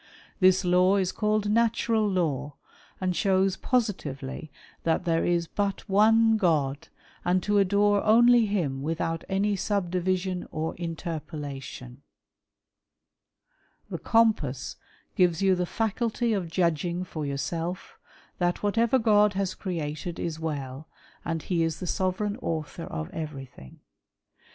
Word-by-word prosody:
This 185 -1 +4
law 180 +2 +4
is 190 -2 0
callednatural 215 +1 +1
law, 145 -6 -1 0.4
and 185 -1 -1
shows 190 -1 +2
positively 155 - -2 0.3
that 165 +2 0
there 165 -1 +2
•' - - 0
is 170 -1 +1
but 200 +2 -3
one 220 +2 +4
God^ 145 -7 +1 0.4
and 180 0 +1
to 205 -1 +2
adore 200 +1 +3
only 235 +1 +6
him 155 -10 -1
without 165 +2 -2
any 200 +2 +1
sub 195 -2 -1
division 185 0 -1
'' - - -38
or 160 +1 -2
interpolation. 150 -6 -6 1.9
The - - -3
Compass 210 - +1 0.4
gives 180 -1 +2
you 190 -1 +5
the 180 -1 0
fliculty 225 +3 -1
of 180 -4 -3
"judging 170 +1 0
for 160 -4 -6
yourself, 165 +6 -4 0.4
that 175 +1 0
whatever 230 +5 +3
God 210 -3 +4
has 195 -1 -1
created 165 -2 -4
is 160 -2 -3
well, 145 -2 -5 0.2
" - - -29
and 165 -2 -3
he 175 -3 0
is 165 -1 -1
the 185 - -5
sovereign 190 +4 -1
author 160 +1 -4
of 80 0 -5
everything. 135 - -8
180 Hz, 130 wpm, -27 LUFS, 160-205 Hz, 1.9 s, only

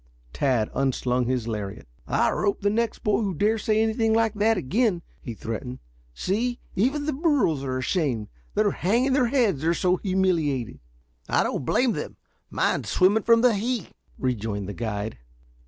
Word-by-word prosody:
Tad 125 -6 +1
unslung 125 -2 0
his 125 -3 -1
lariat. 105 -3 -5 0.2
"I'll - - +2
rope 205 -1 0
the 205 0 +2
next 230 +1 -1
boy 210 0 +2
who 195 -4 -1
dares 215 +6 +1
say 220 0 +3
anything 225 0 +1
like 225 -1 +2
that 220 +1 +2
again," 185 - 0 0.2
he 120 -4 -6
threatened. 125 +4 -5 0.4
"See, 240 - -1 0.2
even 270 +9 +1
the 305 - 0
burros 270 - +1
are 130 -1 -2
ashamed. 130 - -1 0.3
They're - - +3
hanging 235 - +1
their 260 -3 +3
heads, 230 - +1
they're 165 +2 +2
so 180 +2 +2
humiliated." 170 - 0 0.5
"I - - +3
don't 130 - -2
blame 250 - +2
them. - - -5 0.3
Mine's - - 0
swimming 195 +4 +3
from 230 +2 +4
the 250 -1 +5
heat," 225 0 -2 0.3
rejoined 110 -6 -2
the 100 - -5
guide. 110 - -4
190 Hz, 165 wpm, -25 LUFS, -, 0.5 s, the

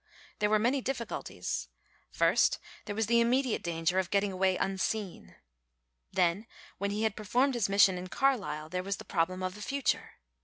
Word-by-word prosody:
There 210 - +2
were 215 - +4
many 245 +6 +1
difficulties. 250 -2 -4 0.4
First - - +3 0.3
there 205 - -4
was 220 +1 +1
the 235 +2 +3
immediate 250 +1 +1
danger 170 +2 0
of 185 -2 -1
getting 200 0 +1
away 185 0 +1
unseen. 195 0 -3 0.8
Then 185 +3 +1 0.3
when 200 - -1
he 210 +2 -1
had 220 -2 +1
performed 250 +6 +1
his 230 -5 0
mission 195 -2 +5
in 180 - -6
Carlisle 195 - 0
there 180 +2 -2
was 195 +1 -3
the - - -10
problem 185 +3 -1
of 185 0 -2
the 210 - -11
future. 275 +4 -1
200 Hz, 170 wpm, -30 LUFS, 185-235 Hz, 0.8 s, mission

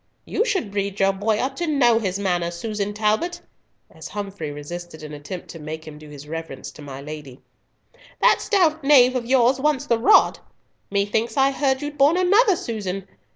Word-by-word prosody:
You - - 0
should 370 - -1
breed 200 0 -3
your 195 0 +3
boy 210 +2 0
up 260 +5 -2
to 345 - -2
know 245 -7 +4
his 190 -4 -2
manners, 175 -3 -1
Susan 205 +2 -3
Talbot," 220 +12 0 0.5
as - - -10
Humfrey 200 -6 -5
resisted 155 +3 -8
an 150 0 -8
attempt 150 +5 -8
to 165 - -9
make 155 +1 -7
him 150 -1 -10
do 155 -1 -13
his 145 0 -11
reverence 165 +1 -6
to - - -14
my 140 -2 -8
lady; 145 -3 -9 0.8
"that - - +4
stout 325 -7 +2
knave 260 -3 +6
of 240 -2 -2
yours 255 0 +3
wants 290 -1 +1
the 235 -5 +1
rod. 335 - +5 0.5
Methought 210 +4 -1
I 270 0 +4
heard 270 0 0
you'd 290 0 -6
borne 290 +5 +5
another, 390 +3 +4
Susan! 195 - -4
210 Hz, 185 wpm, -22 LUFS, 170-270 Hz, 0.8 s, knave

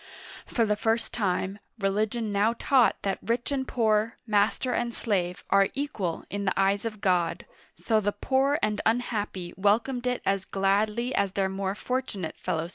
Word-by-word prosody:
For 230 - +1
the 210 -1 +1
first 225 +2 0
time, 195 -2 -1 0.2
religion 215 +2 0
now 210 +3 +2
taught 260 -4 +4
that 195 -1 -1
rich 235 +4 -1
and 265 -2 -1
poor, 220 -1 +1
master 220 +3 +1
and 235 0 -1
slave, 180 -5 -1
are 195 0 +5
equal 220 - -2
in 200 0 -2
the 195 - 0
eyes 195 +2 +2
of 215 -3 -5
God, 180 -3 +1 0.3
so 220 -2 +1
the 205 -1 0
poor 270 +5 +1
and 210 0 +1
unhappy 210 -6 -1
welcomed 225 +6 +1
it 250 0 -1
as 195 -1 +1
gladly 210 +6 0
as 195 -4 +1
their 195 -1 +1
more 190 0 -2
fortunate 230 -8 -3
fellow 160 - -1
citizens. 170 - -7
210 Hz, 170 wpm, -27 LUFS, 195-235 Hz, 0.3 s, are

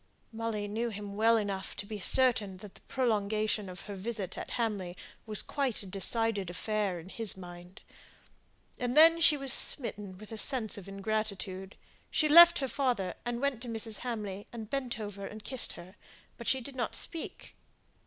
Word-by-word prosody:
Molly 220 -2 -3
knew 225 +3 -2
him 205 -2 -7
well 225 +2 +4
enough 200 -3 -3
to 205 - -6
be 210 0 -7
certain 220 -4 +5
that 195 +1 -12
the - - -18
prolongation 215 -4 -1
of 180 - -9
her 205 - -8
visit 195 -1 -4
at - - -7
Hamley 200 -6 -2 0.3
was 215 -2 0
quite 270 -7 -2
a - - -11
decided 200 +1 +1
affair 200 0 -2
in 165 - -12
his 220 -1 -2
mind; 175 +1 -12 1.0
and 245 +2 -2
then 330 +2 +7
she 310 -2 +5
was 275 -2 +3
smitten 205 -8 +2
with 215 +2 -12
a 220 - -3
sense 240 -3 +4
of 195 -2 -7
ingratitude. 195 -2 -4 0.3
She 310 - +1
left 340 +3 +9
her 270 - -1
father, 245 -10 -1
and 240 0 -2
went 280 -4 -1
to 250 - -5
Mrs. 225 -1 -3
Hamley, 210 -5 -5
and 225 -2 -8
bent 255 -4 -3
over 205 -2 -7
her 195 - -5
and 215 0 -10
kissed 260 -2 -2
her; 180 +2 -12 0.4
but 235 - -10
she 265 - +2
did 270 +2 -9
not 240 -3 -3
speak. 330 - -3
215 Hz, 185 wpm, -30 LUFS, 195-240 Hz, 1.0 s, left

